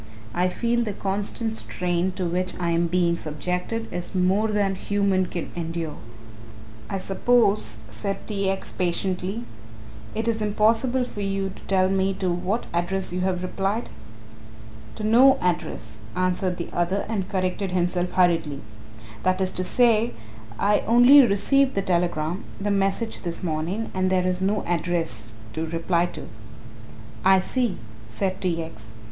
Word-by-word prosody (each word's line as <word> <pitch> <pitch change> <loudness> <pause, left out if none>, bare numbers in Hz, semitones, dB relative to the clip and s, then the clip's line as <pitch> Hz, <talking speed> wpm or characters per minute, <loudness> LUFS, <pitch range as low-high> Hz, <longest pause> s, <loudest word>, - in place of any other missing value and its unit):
I 180 +1 +2
feel 235 +5 0
the 210 -3 -3
constant 205 +3 -2
strain 180 0 -1
to 185 -1 -3
which 180 +2 -1
I 170 -1 0
am 170 +1 +2
being 170 -1 +2
subjected 180 +9 -3
is 175 +2 -4
more 190 +4 +3
than 205 -2 +1
human 195 -1 +1
can 175 - -5
endure." 165 -2 -4 0.9
"I 195 - -1
suppose," 200 - +2
said 110 - -4
T. 200 -2 -1
X. 195 0 -2
patiently, 185 +4 -2 0.7
"it 220 +1 -1
is 225 -1 0
impossible 225 +5 +2
for 210 -4 -6
you 195 -1 -1
to - - -12
tell 190 -1 +3
me 195 0 +1
to 185 -2 -1
what 185 +6 -1
address 180 +2 -1
you 180 - -1
have 185 -1 0
replied?" 195 +5 -2 1.0
"To 215 - -6
no 245 +5 +6
address," 170 -11 -2 0.2
answered 185 0 0
the 170 - -5
other 175 +3 0
and 200 -4 -2
corrected 185 +1 -1
himself 180 0 0
hurriedly; 165 -6 +2 0.6
"that 185 0 +1
is 185 -1 +1
to 185 - -1
say 230 +2 +4 0.4
I 205 +1 +3
only 245 +5 +8
received 260 +5 +3
the 195 - +1
telegram 175 -1 0 0.2
the 205 +1 -1
message 195 +3 0
this 170 +1 -4
morning 175 +7 -2
and 185 0 +1
there 185 -1 +2
is 185 0 0
no 200 +2 +1
address 165 -11 -1 0.2
to 160 +1 -2
reply 170 +1 +1
to." - - -8 1.0
"I 190 0 +6
see," 230 +2 0 0.3
said 185 - -2
T. 170 -3 0
X. 110 -8 -10
185 Hz, 150 wpm, -24 LUFS, 175-205 Hz, 1.0 s, only